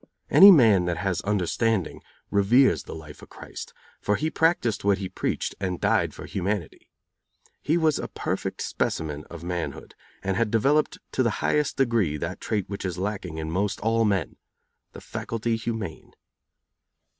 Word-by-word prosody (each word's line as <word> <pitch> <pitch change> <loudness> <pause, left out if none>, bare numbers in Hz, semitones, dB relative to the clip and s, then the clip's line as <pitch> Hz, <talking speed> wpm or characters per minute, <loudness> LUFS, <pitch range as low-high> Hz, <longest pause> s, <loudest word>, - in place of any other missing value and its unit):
Any 200 - +10
man 110 - +6
that 85 -1 -1
has 90 -1 -1
understanding 105 0 0 0.3
reveres 115 +7 +4
the - - -7
life 75 -2 -11
of - - -13
Christ, - - -9 0.3
for 105 - +1
He 155 +6 -1
practiced 160 -11 +1
what 100 -1 +3
He 95 -2 -4
preached - - -3
and 95 -3 -2
died - - +2
for - - -8
humanity. 95 -2 -4 0.7
He 160 +3 +1
was 160 -3 +2
a - - -4
perfect - - -3
specimen 75 -2 -2
of 85 -1 -10
manhood, 85 -5 -4 0.3
and 95 -1 -1
had 115 0 +1
developed 140 +8 +2
to - - 0
the 120 - +3 0.2
highest 150 -1 +1
degree 115 - +1
that 85 +5 -5
trait 105 -4 -2
which 100 0 -6
is 90 -3 -3
lacking 95 -4 -4
in 80 0 -4
most 100 +4 -1
all 115 +1 +2
men 100 -5 0 0.6
the - - -10
faculty 115 0 -3
humane. 110 -6 -5
100 Hz, 160 wpm, -25 LUFS, 90-115 Hz, 0.7 s, Any